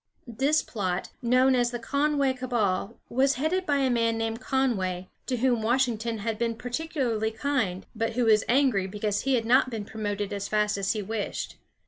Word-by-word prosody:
This 270 +6 +1
plot, 190 -4 -3
known 255 +2 +4
as 245 -1 +2
the 240 - -4
Conway 280 +3 +1
cabal, 235 -5 -1
was 265 +3 +2
headed 345 +8 -1
by 285 - +2
a 270 -2 +2
man 230 -1 +1
named 225 +1 -2
Conway, 195 -10 -1 0.2
to 255 - 0
whom 240 -1 +2
Washington 230 -1 +1
had 215 +1 -3
been 230 -1 0
particularly 245 -3 -2
kind, 220 -6 -1
but 225 +1 -1
who 245 +1 +1
was 215 -1 +5
angry 245 -7 +3
because 205 +1 -1
he 270 -1 +2
had 230 -2 0
not 255 +2 +4
been 220 -4 -5
promoted 205 -1 -3
as 200 0 -3
fast 210 -1 +1
as 195 -1 0
he 215 -2 -3
wished. 215 +1 -4
230 Hz, 180 wpm, -27 LUFS, 210-260 Hz, 0.2 s, was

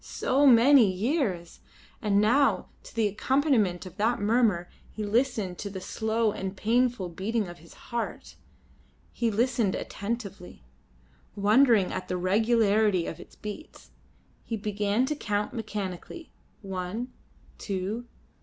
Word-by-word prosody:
So 280 +2 +1
many 245 -3 +7
years! 195 - -2 0.4
And 200 -1 +2
now 245 +7 +3
to - - -14
the 225 -2 +2
accompaniment 215 - +1
of 185 -1 -11
that 225 +4 +1
murmur 205 -4 +2 0.2
he 215 - -6
listened 215 -5 0
to 200 - -4
the 190 -1 -6
slow 220 +3 0
and 190 -1 -5
painful 235 -3 +1
beating 205 +5 -2
of 175 0 -10
his 165 +2 -16
heart. 235 -1 -5 0.8
He 235 - 0
listened 230 -1 +1
attentively, 200 - -6 0.7
wondering 215 0 +4
at 185 - -4
the 180 - -2
regularity 210 -1 +2
of 160 - -6
its - - -13
beats. 210 +9 -9 0.5
He 225 - -4
began 210 +2 0
to 300 +3 -2
count 210 -6 -2
mechanically. 210 - -6 0.3
One, 195 +6 -4 0.5
two. 200 +4 -3
210 Hz, 125 wpm, -27 LUFS, 190-235 Hz, 0.8 s, many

